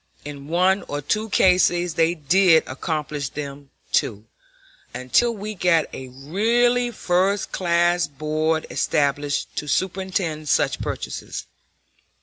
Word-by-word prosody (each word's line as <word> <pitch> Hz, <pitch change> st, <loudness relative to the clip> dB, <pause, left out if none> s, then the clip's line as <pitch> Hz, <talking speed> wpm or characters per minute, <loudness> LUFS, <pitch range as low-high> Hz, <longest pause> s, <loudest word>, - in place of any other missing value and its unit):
In 140 Hz, -1 st, -8 dB
one 185 Hz, +4 st, +2 dB
or 145 Hz, -, -3 dB
two 215 Hz, +10 st, -1 dB
cases 180 Hz, -3 st, +3 dB
they 165 Hz, +2 st, +2 dB
did 165 Hz, +2 st, +4 dB
accomplish 145 Hz, 0 st, -3 dB
them 140 Hz, -1 st, -7 dB, 0.2 s
too, 105 Hz, -1 st, 0 dB, 0.7 s
until 130 Hz, -, +2 dB
we 215 Hz, -1 st, -6 dB
got 170 Hz, -5 st, +2 dB
a 130 Hz, -, -7 dB
really 230 Hz, -, +1 dB
first 195 Hz, -2 st, 0 dB
class 175 Hz, -1 st, +2 dB
board 155 Hz, +2 st, -1 dB
established 145 Hz, 0 st, 0 dB
to 150 Hz, -, -3 dB
superintend 180 Hz, -4 st, -2 dB
such -, -, +1 dB
purchases. -, -, -5 dB
165 Hz, 115 wpm, -22 LUFS, 145-190 Hz, 0.7 s, did